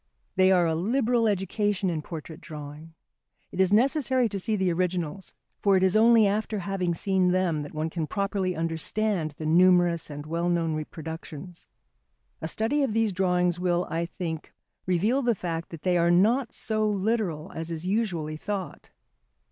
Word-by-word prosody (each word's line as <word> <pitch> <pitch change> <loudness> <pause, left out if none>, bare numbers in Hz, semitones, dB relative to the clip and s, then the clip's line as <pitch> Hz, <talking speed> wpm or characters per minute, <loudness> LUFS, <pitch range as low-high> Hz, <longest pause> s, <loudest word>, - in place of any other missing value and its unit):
They 185 0 +5
are 180 -2 +4
a 165 - +1
liberal 230 +6 +1
education 200 -1 0
in 160 -2 -2
portrait 160 0 -8
drawing. 155 +1 -9 0.6
It 180 - -7
is 190 0 +3
necessary 260 +2 +3
to 200 - -3
see 215 +3 -1
the 190 -3 +1
originals, 180 +1 -3 0.2
for 200 -2 +4
it 185 - +1
is 190 +1 +3
only 225 0 +6
after 210 +2 0
having 185 -2 -2
seen 190 +1 +1
them 180 -4 +1
that 145 +1 -8
one 155 +1 -2
can 160 -3 -3
properly 195 -2 -1
understand 165 +1 -1
the 155 - -5
numerous 175 0 +4
and 145 0 -7
well 170 +2 -1
known 165 -2 +1
reproductions. 160 +2 -7 0.7
A 160 - -3
study 225 - 0
of 265 -6 0
these 225 -2 +1
drawings 180 -1 +1
will, 180 0 +1
I 170 +1 -1
think, 165 -3 -5 0.4
reveal 205 +10 +2
the 240 -3 +1
fact 170 -2 -4
that 165 -3 -10
they 180 -2 +2
are 170 0 +3
not 225 +8 +3
so 215 -1 +1
literal 200 -6 -1
as 160 +1 -5
is 165 0 -5
usually 180 -7 -1
thought. 195 +2 -5
180 Hz, 170 wpm, -26 LUFS, 165-205 Hz, 0.7 s, only